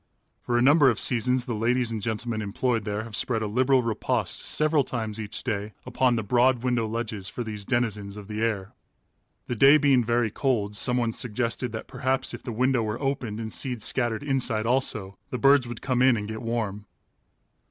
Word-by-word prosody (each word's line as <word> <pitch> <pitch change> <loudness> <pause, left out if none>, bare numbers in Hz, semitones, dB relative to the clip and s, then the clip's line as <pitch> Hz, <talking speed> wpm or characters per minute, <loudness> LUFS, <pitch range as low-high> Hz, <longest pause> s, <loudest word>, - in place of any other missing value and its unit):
For 120 - 0
a 120 - +3
number 145 0 +6
of 115 - 0
seasons 125 +1 +3
the 120 - -3
ladies 115 +2 0
and 110 -2 -3
gentlemen 110 +1 -3
employed 110 +2 -1
there 105 +1 -2
have 115 -2 -8
spread 115 0 +1
a - - -1
liberal 130 +4 +2
repast 115 -2 -2
several 155 -1 +2
times 110 -4 -4
each 110 0 -5
day 105 -3 -3
upon 125 -1 +1
the 110 - -1
broad 125 +3 +2
window 120 -3 0
ledges 110 -3 -4
for 120 - -5
these 105 -3 -6
denizens 105 -5 -1
of 105 -1 -9
the 105 0 -4
air. 105 -4 -2 0.7
The - - -3
day 135 +6 +7
being 140 -4 +3
very 120 -1 +1
cold, 105 -7 -1
someone 120 +1 +1
suggested 120 +1 -2
that 110 - -5
perhaps 130 0 -2
if - - -7
the 120 - -6
window 125 +2 +1
were 110 0 -3
opened 130 -6 -2
and 110 -1 -5
seed 125 -5 -2
scattered 120 0 -1
inside 130 -6 0
also, 115 -6 -1
the 125 - -3
birds 135 +1 +4
would 120 -1 -8
come 130 -2 0
in 130 -2 +5
and 105 -1 -4
get 110 0 -6
warm. 110 -4 -3
115 Hz, 195 wpm, -26 LUFS, 110-125 Hz, 0.7 s, day